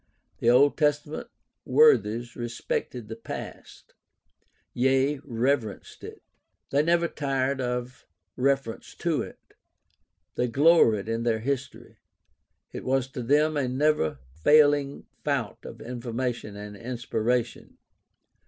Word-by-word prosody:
The 115 Hz, -, +3 dB
Old 135 Hz, +4 st, +5 dB
Testament 150 Hz, 0 st, 0 dB, 0.4 s
worthies 120 Hz, -, +3 dB
respected 120 Hz, 0 st, -4 dB
the 110 Hz, -, -6 dB
past; 115 Hz, -, -9 dB, 0.8 s
yea, 135 Hz, +3 st, +2 dB
reverenced 120 Hz, -1 st, -2 dB
it. -, -, -10 dB, 0.5 s
They 140 Hz, -, +3 dB
never 170 Hz, +2 st, +2 dB
tired 135 Hz, -3 st, -1 dB
of 125 Hz, 0 st, -4 dB, 0.3 s
reference 135 Hz, -3 st, -1 dB
to -, -, 0 dB
it. -, -, -8 dB, 1.0 s
They 125 Hz, -, 0 dB
gloried 120 Hz, -6 st, +4 dB
in 115 Hz, 0 st, -1 dB
their 115 Hz, -2 st, 0 dB
history; 130 Hz, +1 st, -4 dB, 0.7 s
it -, -, -7 dB
was 130 Hz, 0 st, 0 dB
to 130 Hz, -, -6 dB
them 150 Hz, +5 st, +2 dB
a 140 Hz, -3 st, 0 dB
never 130 Hz, -, +1 dB, 0.2 s
failing 145 Hz, -, +4 dB, 0.2 s
fount -, -, -2 dB
of -, -, -9 dB
information 120 Hz, -2 st, -4 dB
and 105 Hz, 0 st, -8 dB
inspiration. 120 Hz, 0 st, -2 dB
130 Hz, 110 wpm, -26 LUFS, 115-140 Hz, 1.0 s, Old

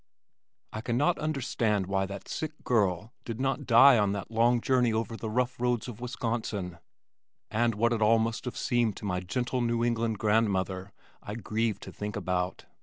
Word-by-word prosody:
I 110 Hz, -, -4 dB
cannot 130 Hz, +9 st, +1 dB
understand 120 Hz, -9 st, 0 dB
why 95 Hz, 0 st, 0 dB
that 100 Hz, 0 st, -8 dB
sick 155 Hz, 0 st, -4 dB
girl 105 Hz, -2 st, +1 dB
did 115 Hz, -1 st, -5 dB
not 135 Hz, 0 st, -1 dB
die 125 Hz, +1 st, +8 dB
on 100 Hz, -1 st, +2 dB
that 100 Hz, +1 st, -5 dB
long 120 Hz, +2 st, +3 dB
journey 125 Hz, -1 st, +2 dB
over 115 Hz, 0 st, -2 dB
the 110 Hz, -1 st, -5 dB
rough 125 Hz, +3 st, -1 dB
roads 125 Hz, -2 st, 0 dB
of 120 Hz, -2 st, -8 dB
Wisconsin, 115 Hz, -7 st, -3 dB, 0.7 s
and 115 Hz, 0 st, +1 dB
what 115 Hz, +3 st, +2 dB
it 110 Hz, -, -2 dB
all 110 Hz, +2 st, +5 dB
must 115 Hz, +2 st, -1 dB
have 125 Hz, -, -5 dB
seemed 120 Hz, -4 st, +1 dB
to -, -, -7 dB
my 90 Hz, -2 st, -1 dB
gentle 120 Hz, +7 st, -2 dB
New 120 Hz, 0 st, +1 dB
England 115 Hz, -2 st, 0 dB
grandmother 100 Hz, -3 st, 0 dB, 0.3 s
I 105 Hz, -, -6 dB
grieve 110 Hz, 0 st, -1 dB
to -, -, -8 dB
think 105 Hz, 0 st, -5 dB
about. 90 Hz, -2 st, -2 dB
115 Hz, 180 wpm, -29 LUFS, 105-120 Hz, 0.7 s, die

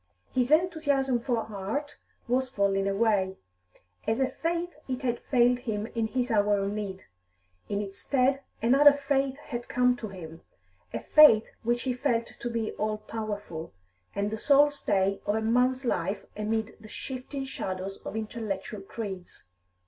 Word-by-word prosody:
His 250 Hz, -1 st, +2 dB
enthusiasm 295 Hz, -6 st, +2 dB
for 240 Hz, 0 st, 0 dB
art 220 Hz, +9 st, -4 dB, 0.3 s
was 255 Hz, +2 st, +1 dB
falling 200 Hz, -4 st, +1 dB
away; 195 Hz, -2 st, +1 dB, 0.7 s
as 225 Hz, +3 st, +1 dB
a 265 Hz, -, +3 dB
faith 340 Hz, +1 st, -2 dB
it 260 Hz, 0 st, -3 dB
had 240 Hz, -2 st, 0 dB
failed 245 Hz, -1 st, +3 dB
him 215 Hz, -4 st, -3 dB
in 230 Hz, -1 st, 0 dB
his 250 Hz, +1 st, -1 dB
hour 205 Hz, -1 st, +3 dB
of 195 Hz, 0 st, -1 dB
need. 200 Hz, -3 st, -4 dB, 0.7 s
In 205 Hz, 0 st, 0 dB
its 195 Hz, 0 st, -8 dB
stead 270 Hz, 0 st, +2 dB, 0.2 s
another 280 Hz, +5 st, +7 dB
faith 275 Hz, -1 st, 0 dB
had 240 Hz, -5 st, -6 dB
come 250 Hz, 0 st, +3 dB
to 225 Hz, -, -5 dB
him, 165 Hz, -4 st, -9 dB, 0.5 s
a 115 Hz, -, -3 dB
faith 230 Hz, -, +7 dB, 0.2 s
which 240 Hz, +1 st, 0 dB
he 260 Hz, -, 0 dB
felt 245 Hz, -3 st, 0 dB
to 240 Hz, -, -6 dB
be 230 Hz, -2 st, -2 dB
all 215 Hz, 0 st, 0 dB
powerful, 210 Hz, -, -5 dB, 0.4 s
and 200 Hz, +1 st, 0 dB
the 220 Hz, -, -3 dB
sole 290 Hz, +2 st, +5 dB
stay 195 Hz, -8 st, 0 dB
of 205 Hz, -, +2 dB
a 220 Hz, -, 0 dB
man's 250 Hz, +3 st, +2 dB
life 195 Hz, -2 st, -1 dB
amid 220 Hz, +1 st, -2 dB
the 220 Hz, -, -12 dB
shifting 265 Hz, +3 st, -5 dB
shadows 190 Hz, -6 st, -4 dB
of -, -, -8 dB
intellectual 215 Hz, -2 st, -4 dB
creeds. 195 Hz, -3 st, -6 dB
230 Hz, 155 wpm, -28 LUFS, 205-260 Hz, 0.7 s, another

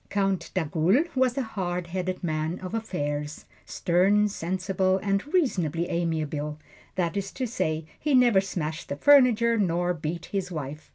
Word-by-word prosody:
Count 195 Hz, -2 st, 0 dB
d'Agoult 185 Hz, -, +1 dB
was 260 Hz, -1 st, +2 dB
a 270 Hz, -, +1 dB
hard 180 Hz, -6 st, -3 dB
headed 185 Hz, +1 st, -3 dB
man 155 Hz, +1 st, -1 dB
of 185 Hz, +2 st, -7 dB
affairs 150 Hz, -9 st, -3 dB, 0.2 s
stern, 195 Hz, +4 st, +3 dB
sensible 190 Hz, 0 st, 0 dB
and 200 Hz, +8 st, -1 dB
reasonably 175 Hz, -, +1 dB
amiable 155 Hz, -3 st, -2 dB, 0.4 s
that 175 Hz, 0 st, -1 dB
is 195 Hz, -1 st, -3 dB
to 260 Hz, -, -3 dB
say, 160 Hz, -9 st, -2 dB
he 295 Hz, -3 st, +1 dB
never 240 Hz, -6 st, +5 dB
smashed 160 Hz, -5 st, -4 dB
the -, -, -2 dB
furniture, 235 Hz, -, +5 dB
nor 175 Hz, -2 st, +1 dB
beat 165 Hz, +1 st, -4 dB
his 190 Hz, -2 st, -2 dB
wife. 150 Hz, -1 st, -6 dB
185 Hz, 150 wpm, -26 LUFS, 160-210 Hz, 0.4 s, never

